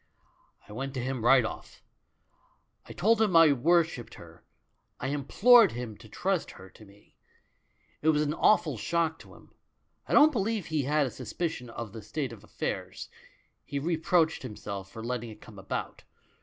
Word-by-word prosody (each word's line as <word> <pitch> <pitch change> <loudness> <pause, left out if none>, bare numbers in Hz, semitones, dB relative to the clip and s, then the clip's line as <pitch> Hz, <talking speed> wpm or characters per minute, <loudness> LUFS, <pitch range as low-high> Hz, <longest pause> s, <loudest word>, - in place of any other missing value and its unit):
"I - - -11
went 135 +4 -5
to - - -2
him 130 -2 -3
right 130 0 +5
off. - - -8 1.0
I - - -10
told 225 +3 +2
him 205 -6 +2
I 165 -3 +7
wor 170 +7 +4
shipped 135 -8 -9
her; - - -15 0.6
I - - -3
implored 205 - +5
him 120 -2 -6
to 110 0 -15
trust 185 - -1
her 95 -1 -13
to 110 - -16
me. 100 +1 -22 0.9
It 155 - +2
was 150 -1 +3
an 150 0 -1
awful 155 - +2
shock 165 +6 -1
to - - -15
him; - - -19 0.5
I - - -3
don't 300 +1 +7
believe 220 - -1
he 155 -4 -1
had 145 - -3
had 150 -2 +3
a 130 - -4
suspicion 155 -8 -5
of 115 -3 -7
the 110 - -8
state 130 +3 -4
of 105 -3 -13
affairs - - -5 0.3
— - - -39
he 140 - -5
re 165 +5 0
proached 160 0 +1
himself 100 -5 -7
for 110 - -9
letting 120 -1 -4
it 110 -1 -12
come 105 -2 -13
about. 95 - -5
140 Hz, 185 wpm, -28 LUFS, 115-165 Hz, 1.0 s, I